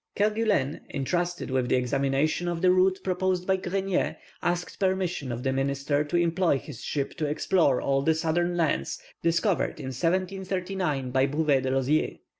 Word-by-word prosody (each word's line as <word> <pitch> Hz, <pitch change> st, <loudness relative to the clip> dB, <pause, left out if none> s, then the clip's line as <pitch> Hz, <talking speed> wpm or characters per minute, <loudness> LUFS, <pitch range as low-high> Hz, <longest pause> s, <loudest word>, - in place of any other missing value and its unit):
Kerguelen, 210 Hz, -9 st, +1 dB
entrusted 175 Hz, +3 st, -2 dB
with 130 Hz, -1 st, 0 dB
the -, -, +3 dB
examination 135 Hz, +6 st, 0 dB
of 170 Hz, 0 st, -2 dB
the 180 Hz, -, +6 dB
route 185 Hz, +1 st, +3 dB
proposed 185 Hz, -1 st, 0 dB
by 190 Hz, 0 st, +2 dB
Grenier, 190 Hz, 0 st, -1 dB, 0.2 s
asked 175 Hz, 0 st, -2 dB
permission 185 Hz, -8 st, 0 dB
of 120 Hz, +1 st, -4 dB
the 135 Hz, -1 st, +1 dB
minister 140 Hz, +2 st, 0 dB
to 155 Hz, +4 st, -1 dB
employ 170 Hz, -2 st, +2 dB
his 135 Hz, -3 st, -9 dB
ship 140 Hz, -2 st, -2 dB
to 155 Hz, -, -1 dB
explore 150 Hz, -2 st, +2 dB
all 135 Hz, 0 st, +1 dB
the 160 Hz, +3 st, +2 dB
southern 175 Hz, +2 st, 0 dB
lands 155 Hz, -, 0 dB, 0.2 s
discovered 170 Hz, +3 st, +1 dB
in 130 Hz, 0 st, -5 dB
1739 185 Hz, -3 st, -1 dB
by 130 Hz, +1 st, +3 dB
Bouvet 145 Hz, -1 st, +2 dB
de 130 Hz, -, -1 dB
Lozier. 135 Hz, +3 st, +1 dB
165 Hz, 160 wpm, -27 LUFS, 135-185 Hz, 0.2 s, the